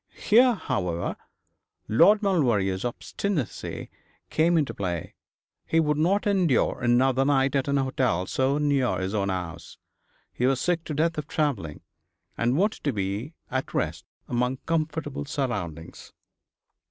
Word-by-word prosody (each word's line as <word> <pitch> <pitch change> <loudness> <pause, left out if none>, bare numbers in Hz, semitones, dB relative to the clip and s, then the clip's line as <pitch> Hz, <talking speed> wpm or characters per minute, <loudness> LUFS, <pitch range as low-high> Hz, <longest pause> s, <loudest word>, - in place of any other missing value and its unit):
Here, 245 +3 +5
however, 90 - -2 0.7
Lord 205 - +5
Maulevrier's 115 - +1
obstinacy 145 - -3 0.4
came 165 +2 +3
into 150 -4 0
play. 90 -4 -4 0.5
He 165 - +2
would 150 -2 +1
not 190 +6 +2
endure 185 - +2
another 130 +2 +3
night 135 -1 +2
at 135 -1 +1
an 140 0 +1
hotel 130 -9 0
so 130 +7 +1
near 140 -4 +1
his 95 +2 -3
own 100 -2 0
house. 85 -3 -5 0.6
He 125 - +1
was 135 -1 +2
sick 175 -2 0
to 150 - -4
death 160 +1 +1
of 150 - -6
travelling, 120 - -2 0.5
and 120 +4 +1
wanted 205 +5 0
to 140 - +2
be 105 - -3 0.2
at 130 0 -3
rest - - -1 0.2
among 125 +2 0
comfortable 155 -3 -2
surroundings. 90 - -4
135 Hz, 135 wpm, -26 LUFS, 110-160 Hz, 0.7 s, Here